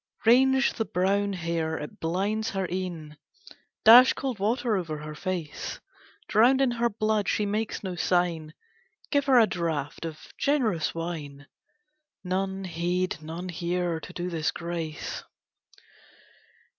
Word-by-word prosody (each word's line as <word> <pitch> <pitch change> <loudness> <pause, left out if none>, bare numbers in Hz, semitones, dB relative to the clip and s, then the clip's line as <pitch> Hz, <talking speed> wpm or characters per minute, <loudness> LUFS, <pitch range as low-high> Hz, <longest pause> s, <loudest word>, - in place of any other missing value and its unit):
Range 265 +3 +5
the 225 - -2
brown 200 +2 +1
hair, 165 -3 -2
it 150 - -8
blinds 200 +7 -1
her 195 -1 -2
eyne, 170 -5 -5 0.7
Dash 245 +4 +9
cold 260 -6 -4
water 225 +2 +1
over 165 -5 -3
her 150 +1 -7
face! 170 -2 -4 0.5
Drowned 240 +5 +5
in 270 -2 +3
her 235 0 +1
blood, 215 -1 0
she 210 - +1
makes 210 +2 -2
no 190 -2 -3
sign, 170 -3 0 0.6
Give 285 -2 +2
her 265 -2 +5
a 230 - +7
draught 165 -6 -3
of 160 -2 -5 0.2
generous 230 - +1
wine. 155 -4 -5 0.8
None 190 +1 -2
heed, 175 -1 -2
none 165 +4 -6
hear, 175 0 -1
to 160 - -10
do 180 0 -4
this 160 -2 0
grace. 170 -2 -5
180 Hz, 130 wpm, -27 LUFS, 165-215 Hz, 0.8 s, Dash